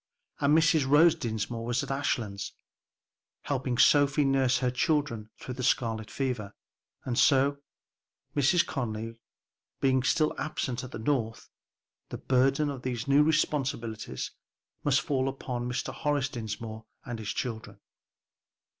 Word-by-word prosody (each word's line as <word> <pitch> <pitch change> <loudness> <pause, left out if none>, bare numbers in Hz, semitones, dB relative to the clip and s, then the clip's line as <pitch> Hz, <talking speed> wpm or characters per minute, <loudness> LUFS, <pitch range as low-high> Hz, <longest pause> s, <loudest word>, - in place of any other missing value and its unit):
And 145 +2 +4
Mrs. 155 -3 +3
Rose 155 +3 +7
Dinsmore 115 0 -3
was 120 +3 0
at 140 - -5
Ashlands, 115 -7 -2 0.9
helping 130 -3 -1
Sophie 145 +1 +5
nurse 135 -2 +3
her 125 0 0
children 125 -4 0
through 130 - -7
the 130 - -6
scarlet 115 -3 0
fever. 125 -7 -3 0.5
And 120 -2 0
so, 140 +1 +4 0.8
Mrs. 145 +5 +4
Conly 115 -3 -4 0.6
being 130 -1 +3
still 150 +5 +2
absent 130 -4 -3
at 130 - -7
the - - -7
North, 115 -2 -2 0.6
the - - -5
burden 135 +3 +2
of 135 -3 -7
these 125 -1 -3
new 140 +1 +5
responsibilities 130 - -1 0.5
must 145 -1 +3
fall 135 -2 0
upon 125 -2 -4
Mr. 125 0 -3
Horace 145 -2 0
Dinsmore 110 -2 -6 0.2
and 120 -2 -5
his 105 -2 -5
children. 110 -4 -4
130 Hz, 130 wpm, -29 LUFS, 115-140 Hz, 0.9 s, Rose